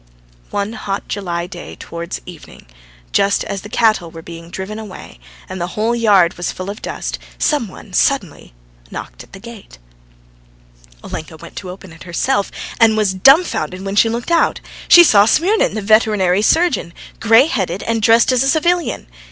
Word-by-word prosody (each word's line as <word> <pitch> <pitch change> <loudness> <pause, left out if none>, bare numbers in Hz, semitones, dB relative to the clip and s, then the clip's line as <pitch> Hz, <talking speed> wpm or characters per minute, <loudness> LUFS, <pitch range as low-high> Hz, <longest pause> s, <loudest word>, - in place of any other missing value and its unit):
One 205 +2 -3
hot 200 -4 -5
July 175 -4 -3
day, 180 - -9
towards 170 +1 -7
evening, 175 -4 -13 0.5
just 200 0 +2
as 195 - -5
the 205 - -10
cattle 215 -7 +1
were 165 0 -11
being 165 0 -10
driven 190 +4 -6
away, 210 -4 -11 0.3
and 185 -1 -7
the 175 +3 -5
whole 225 +3 +1
yard 200 -7 +4
was 175 - -2
full 185 +2 -6
of 210 - -10
dust, - - -5 0.2
some 290 -7 0
one 190 +1 -13
suddenly 200 - 0 0.4
knocked - - -8
at - - -21
the 195 - -10
gate. 230 - -12 1.3
Olenka 160 0 -7
went - - -13
to 185 - -6
open 185 -1 -11
it 165 - -17
herself 200 +6 -1 0.3
and 225 -1 +4
was 210 -3 +1
dumbfounded 190 - +3
when 195 0 -3
she 225 +2 +4
looked 235 +7 -4
out: 335 - +2 0.3
she 345 - +9
saw 205 -10 +5
Smirnin, 360 - +2
the 215 - -3
veterinary 205 -3 +3
surgeon, 265 - +1 0.2
grey 225 +3 +5
headed, 195 - -2
and 230 -1 -1
dressed 230 +3 +4
as 255 -1 +2
a 270 - +2
civilian. 340 +2 0
205 Hz, 170 wpm, -17 LUFS, 180-230 Hz, 1.3 s, she